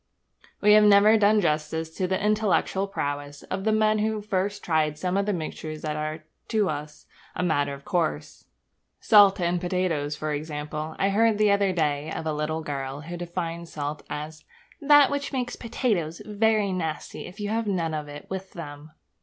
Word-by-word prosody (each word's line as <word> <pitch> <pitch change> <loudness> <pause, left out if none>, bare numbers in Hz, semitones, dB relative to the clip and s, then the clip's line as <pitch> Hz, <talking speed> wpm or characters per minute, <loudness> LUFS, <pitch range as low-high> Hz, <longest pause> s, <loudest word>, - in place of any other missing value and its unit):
We 210 0 +6
have 215 0 +7
never 210 +1 +7
done 210 0 +4
justice 160 0 -1
to 185 - 0
the 190 0 0
intellectual 210 -2 +1
prowess 145 -5 -4
of 190 +1 -4
the 220 - +3
men 215 0 +3
who 215 0 0
first 200 0 -2
tried 155 -2 +1
some 180 +3 -2
of 200 +1 +1
the - - +2
mixtures 155 -3 -5
that 155 -1 -2
are 155 +1 -4 0.2
to 215 -3 +1
us 150 0 -6 0.3
a - - -1
matter 145 -5 +1
of 140 - -15
course. 170 -3 -2 0.5
Salt 205 -3 +6
and 175 0 0
potatoes, 175 -5 -1
for 155 0 -3
example. 150 +1 -5
I 195 - +2
heard 220 +2 +3
the 210 -1 +4
other 200 -1 +3
day 150 -3 -1
of 160 - -4
a 155 - -1
little 155 +2 -2
girl 140 -1 -4
who 170 +3 -7
defined 170 -1 -5
salt 150 0 -4
as 155 +1 -6 0.4
'that 290 -1 +6
which 285 0 -2
makes 250 -2 -2
potatoes 210 - -2
very 215 -1 +1
nasty 160 -4 -4
if 185 +4 -12
you 205 0 -3
have 225 0 -1
none 170 -5 -1
of 150 -1 -4
it 145 0 -9
with 190 0 -6
them.' 145 -2 -9
175 Hz, 185 wpm, -26 LUFS, 155-205 Hz, 0.5 s, have